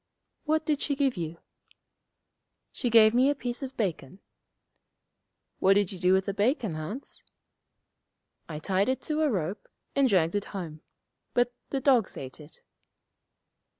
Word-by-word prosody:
'What 315 0 +1
did 295 -2 0
she 285 - 0
give 275 -2 +1
you?' 165 -2 -4 1.3
'She 245 - -2
gave 220 -1 +7
me 255 +3 +4
a 290 - +1
piece 245 -1 -4
of 270 -1 -6
bacon.' 185 - -2 1.4
'What 195 - +5
did 205 -2 +2
you 190 - -7
do 180 0 +3
with 190 0 +3
the 200 - -2
bacon, 215 - +1
Hans?' 180 - -7 1.3
'I 150 -2 -5
tied 195 +6 +1
it 260 - 0
to 310 0 -1
a 310 - +3
rope, 190 - -3 0.3
and 275 -2 +4
dragged 170 -5 +3
it 205 0 -1
home. 160 -4 -6 0.5
But 245 0 +2 0.2
the 275 - -1
dogs 250 -7 +3
ate 130 +2 -8
it.' 150 +1 -14
210 Hz, 150 wpm, -28 LUFS, 180-265 Hz, 1.4 s, gave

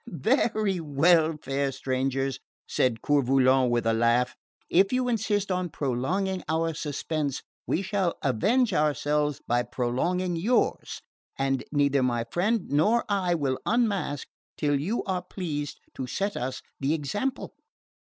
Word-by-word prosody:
"Very 215 - +1
well, 160 +1 +3
fair 135 0 -1
strangers," 135 0 -1 0.3
said 115 -3 0
Coeur 145 -1 +3
Volant 130 0 +3
with 120 -1 0
a 115 - +3
laugh; 115 +2 +2 0.3
"if 195 +3 +3
you 255 0 +1
insist 205 -4 0
on 180 -1 -1
prolonging 165 +8 -1
our 165 +1 +1
suspense 150 -1 -3 0.2
we 180 - 0
shall 190 -3 0
avenge 210 - +2
ourselves 150 -2 +1
by 120 +1 +2
prolonging 170 +10 -1
yours, 215 +10 0 0.3
and 135 -1 0
neither 140 -2 +2
my 120 -2 +1
friend 210 +2 0
nor 210 +12 +3
I 185 -4 +1
will 135 -5 -1
unmask 205 - 0 0.3
till 145 -2 +1
you 195 +11 -1
are 185 -2 -2
pleased 160 -6 -5
to 130 - -5
set 200 +9 -2
us 130 +1 -4 0.2
the 140 +3 +1
example." 205 - -3
150 Hz, 135 wpm, -27 LUFS, 135-190 Hz, 0.3 s, well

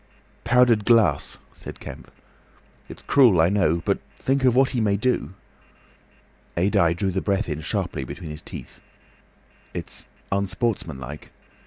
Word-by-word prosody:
"Powdered 120 -3 +4
glass," 110 - +3 0.2
said - - -10
Kemp. - - -10 0.8
"It's - - -11
cruel, 120 -11 +5
I 80 +2 +5
know. 90 -5 +1
But - - +1 0.2
think 135 0 0
of 125 -2 +4
what 130 0 +4
he 125 -3 0
may 100 -2 +2
do!" 100 - -1 1.2
Adye 85 -2 +3
drew 95 +2 -1
the 95 +1 -2
air 100 +2 +2
in 75 -2 -4
sharply 70 - -2
between 80 +5 -7
his 75 - -7
teeth. - - -10 0.9
"It's - - -5 0.2
unsportsmanlike. 95 - -2
100 Hz, 135 wpm, -24 LUFS, 85-120 Hz, 1.2 s, cruel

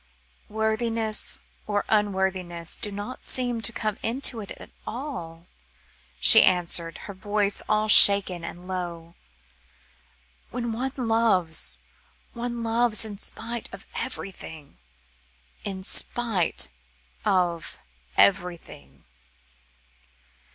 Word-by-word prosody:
"Worthiness 220 0 -1 0.3
or 205 -1 -1
unworthiness 190 -5 -1
do 205 - -4
not 205 +5 -7
seem 245 -3 -1
to 235 - -2
come 215 -2 -3
into 240 0 -1
it 200 - -10
at - - -13 0.2
all," 175 - -6 0.7
she - - +8
answered, 170 -2 +2
her 200 - -7
voice 205 +1 -1
all 215 0 +2
shaken 200 -4 +8
and 175 +2 -8
low. 170 -3 -5 1.4
"When 240 -1 -4
one 255 +4 -3
loves, 225 -9 +3 0.6
one 235 0 -4
loves 230 -1 +2
in 205 -2 -7
spite 230 +3 -4
of - - -11
everything 160 - -7 0.8
in 190 -2 -4
spite 220 -3 -1 0.6
of 175 -3 0 0.4
everything." 100 - 0
205 Hz, 95 wpm, -25 LUFS, 180-230 Hz, 1.4 s, she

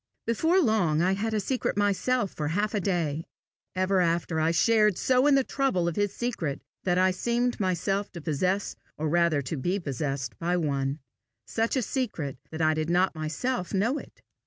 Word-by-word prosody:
Before 320 - +2
long, 190 - +2
I 185 +2 +3
had 215 +3 -1
a - - +2
secret 240 +1 -1
myself 205 +2 +1
for 150 - -3
half 205 +7 0
a 210 - +1
day: 165 -5 -1 0.5
ever 185 +1 +2
after, 170 -1 0
I 160 +1 +2
shared 210 +3 +3
so 255 +2 +3
in 290 - +5
the 270 - +4
trouble 255 -12 0
of 170 - -1
his 205 -1 +1
secret, 175 - -3 0.3
that 180 -1 +2
I 185 0 +4
seemed 240 +6 0
myself 195 +1 0
to 170 - -7
possess 180 +6 -1 0.2
or 155 - -1
rather 170 -2 +2
to 135 +4 -4
be 180 +9 -1
possessed 135 -4 -3
by 175 +1 0
one 140 -3 -1 0.5
such 225 +3 -1
a 260 - +1
secret 175 - -3
that 160 0 -3
I 155 0 +4
did 155 +1 -2
not 180 +2 +3
myself 180 +7 -2
know 230 +9 +1
it. - - -15
185 Hz, 185 wpm, -27 LUFS, 160-220 Hz, 0.5 s, in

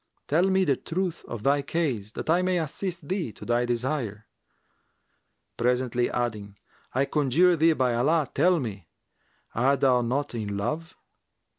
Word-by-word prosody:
Tell 165 +5 +3
me 190 0 +3
the 140 -5 +2
truth 175 0 -3
of 115 -3 -6
thy 140 +1 +3
case, 135 -9 -2
that - - -6
I 170 +3 +3
may 185 0 +1
assist 170 0 -4
thee 185 - -2
to - - -11
thy 120 +1 +1
desire;' 120 -4 -2 1.3
presently 125 0 +1
adding, 105 -4 -3 0.4
'I 135 +1 +3
conjure 155 +6 +3
thee 165 +1 +4
by 130 -4 +1
Allah, 145 +5 +2
tell 180 -1 +3
me, 100 - -6 0.7
art 135 +3 +2
thou 130 -3 +4
not 135 +4 -1
in 105 -3 -3
love?' 155 +11 -3
135 Hz, 150 wpm, -26 LUFS, 120-165 Hz, 1.3 s, thee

